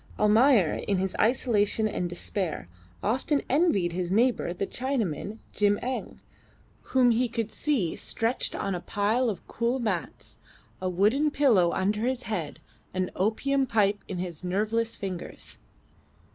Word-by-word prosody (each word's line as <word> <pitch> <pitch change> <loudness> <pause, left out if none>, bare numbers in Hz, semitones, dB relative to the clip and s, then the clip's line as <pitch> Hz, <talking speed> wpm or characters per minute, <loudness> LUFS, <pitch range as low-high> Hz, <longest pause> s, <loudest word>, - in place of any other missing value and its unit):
Almayer, 210 - +4
in 200 - +2
his 190 0 -2
isolation 220 -2 +2
and 180 -4 -2
despair, 175 - -3 0.4
often 265 +7 0
envied 235 - +2
his 175 0 -2
near 220 +6 +4
neighbour 245 -8 -1
the 180 +3 -2
Chinaman, 220 - -2 0.2
Jim 205 0 +3
Eng, 255 +1 -4 0.8
whom 250 -2 +6
he 240 +2 +1
could 225 -2 -3
see 255 - 0
stretched 230 +3 -1
on 195 - -2
a 180 - -2
pile 215 +7 0
of 195 -6 -5
cool 235 +3 -1
mats, 205 - -4 0.4
a 185 - -1
wooden 215 - +2
pillow 230 -13 +3
under 210 +6 0
his 255 0 -1
head, 175 -9 -4 0.4
an 185 0 -1
opium 265 +7 +1
pipe 205 -3 +1
in 185 - -5
his 175 -2 -5
nerveless 215 +5 0
fingers. 185 -3 -7
210 Hz, 145 wpm, -27 LUFS, 185-245 Hz, 0.8 s, whom